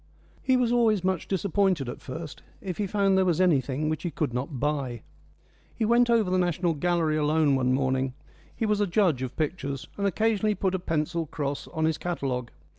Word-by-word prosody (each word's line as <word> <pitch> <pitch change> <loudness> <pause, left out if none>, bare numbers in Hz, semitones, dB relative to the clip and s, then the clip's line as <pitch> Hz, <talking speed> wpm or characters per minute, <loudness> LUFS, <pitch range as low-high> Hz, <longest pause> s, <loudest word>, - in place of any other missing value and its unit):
He 260 -1 +3
was 245 -2 +2
always 225 -5 +3
much 185 -2 -1
disappointed 190 -5 +1
at 120 - -6
first 145 +2 -7 0.2
if 185 -2 -6
he 205 - 0
found 195 -1 +2
there - - +4
was 175 -3 +1
anything 150 -5 +2
which 155 0 -1
he 175 - -2
could 155 -6 -2
not 130 +2 -3
buy. 135 -5 -2 0.7
He 225 - 0
went 240 +2 +4
over 225 -5 +3
the 185 - +2
National 175 -1 +1
Gallery 165 -1 +1
alone 150 -1 +3
one 130 -1 +1
morning; 130 0 0 0.4
he 225 - -1
was 210 -1 +1
a 205 - +2
judge 175 - +2
of 130 -1 -5
pictures, 140 -4 -3
and 200 - +2
occasionally 215 +1 +1
he - - -7
put 190 -2 0
a 190 - 0
pencil 165 -1 -1
cross 145 -2 -4
on 160 -2 -1
his 160 -1 0
catalogue. 130 -8 -2
170 Hz, 200 wpm, -27 LUFS, 140-195 Hz, 0.7 s, there